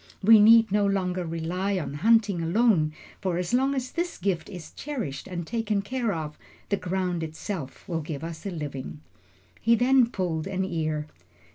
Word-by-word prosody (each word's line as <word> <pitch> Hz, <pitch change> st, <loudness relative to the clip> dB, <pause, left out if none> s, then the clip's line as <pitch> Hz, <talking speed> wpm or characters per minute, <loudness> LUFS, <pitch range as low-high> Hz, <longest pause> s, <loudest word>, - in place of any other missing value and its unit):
We 220 Hz, +2 st, +8 dB
need 225 Hz, 0 st, +7 dB
no 205 Hz, +1 st, +3 dB
longer 185 Hz, -2 st, 0 dB
rely 180 Hz, +4 st, -2 dB
on 155 Hz, -5 st, -4 dB
hunting 205 Hz, +2 st, +3 dB
alone, 170 Hz, -2 st, +3 dB, 0.3 s
for 185 Hz, -3 st, -1 dB
as 180 Hz, +4 st, -2 dB
long 270 Hz, +3 st, +2 dB
as 255 Hz, -1 st, -3 dB
this 345 Hz, +1 st, -3 dB
gift 185 Hz, -2 st, -1 dB
is 180 Hz, -5 st, -9 dB
cherished 235 Hz, -, -5 dB
and 175 Hz, -3 st, -4 dB
taken 215 Hz, -1 st, -1 dB
care 245 Hz, 0 st, -1 dB
of, 155 Hz, -4 st, -5 dB, 0.3 s
the 200 Hz, -, +1 dB
ground 180 Hz, -2 st, -2 dB
itself 160 Hz, -1 st, -6 dB
will 165 Hz, -2 st, -2 dB
give 150 Hz, -1 st, -6 dB
us 165 Hz, -1 st, -6 dB
a -, -, -1 dB
living." 140 Hz, -, -6 dB, 0.6 s
He 230 Hz, +1 st, +4 dB
then 250 Hz, +1 st, +4 dB
pulled 175 Hz, -6 st, -2 dB
an 190 Hz, -1 st, -1 dB
ear. 155 Hz, -4 st, -2 dB
185 Hz, 170 wpm, -26 LUFS, 160-220 Hz, 0.6 s, We